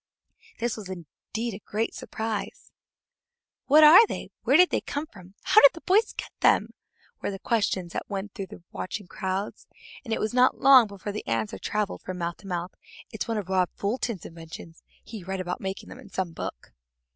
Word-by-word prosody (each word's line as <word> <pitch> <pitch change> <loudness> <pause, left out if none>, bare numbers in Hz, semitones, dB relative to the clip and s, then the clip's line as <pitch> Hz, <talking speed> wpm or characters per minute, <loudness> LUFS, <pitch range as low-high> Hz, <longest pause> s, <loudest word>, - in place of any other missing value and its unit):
This 235 0 -2
was 205 -4 -8
indeed 190 +6 -6
a 195 - -8
great 220 +2 -2
surprise. 220 -2 -5 1.0
"What 305 +3 +7
are 350 +9 +10
they? - - -6
Where 275 - +4
did 360 +1 +6
they - - +1
come 290 +2 -4
from? 190 - -16
How 430 - +6
did 280 - +8
the 330 - -10
boys 425 +4 +3
get - - -7
them?" - - +3 0.5
were - - -2
the 195 - -5
questions 190 -5 -1
that - - -5
went 200 0 -4
through 195 -5 -6
the 170 - -12
watching 200 +2 -5
crowds, 190 +2 -4 0.4
and 235 - -8
it - - 0
was 215 +1 -1
not 250 +1 +4
long 260 -4 +8
before 200 0 -6
the 210 - -6
answer 110 -4 -2
traveled 210 - -2
from 185 -1 -6
mouth 170 -1 -3
to 200 - -14
mouth: 175 0 -3 0.4
"It's - - -4
one 225 -1 -1
of 205 -4 -4
Rob 185 -2 +2
Fulton's 215 -2 -2
inventions. 165 0 -10 0.2
He 220 -5 -9
read 190 +1 -4
about 180 -1 -4
making 190 0 -5
them - - -10
in - - -13
some 185 -2 -3
book." - - -7
200 Hz, 195 wpm, -26 LUFS, 185-235 Hz, 1.0 s, are